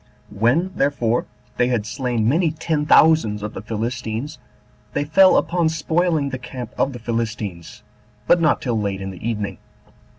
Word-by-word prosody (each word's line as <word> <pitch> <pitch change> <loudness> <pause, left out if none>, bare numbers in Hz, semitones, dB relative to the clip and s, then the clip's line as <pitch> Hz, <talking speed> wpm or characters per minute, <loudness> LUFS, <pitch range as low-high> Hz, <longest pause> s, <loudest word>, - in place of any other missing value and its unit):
4. - - -12
When, 150 - +2
therefore, 125 -4 0 0.3
they 125 - +3
had 120 -4 0
slain 120 -2 -1
many 160 +6 +3
ten 155 -1 -2
thousands 135 -13 +4
of 105 - -5
the - - -6
Philistines, 115 +5 -4 0.5
they 145 - 0
fell 185 +6 +5
upon 170 -2 +1
spoiling 160 -1 0
the 130 -1 -5
camp 125 -2 -8
of 135 - 0
the - - -6
Philistines, 110 -7 -4 0.4
but 175 - +4
not 155 -2 +2
till 120 -4 0
late 100 -2 -2
in 95 0 -5
the 95 +5 -5
evening. 105 -4 -4
125 Hz, 165 wpm, -21 LUFS, 110-155 Hz, 0.5 s, fell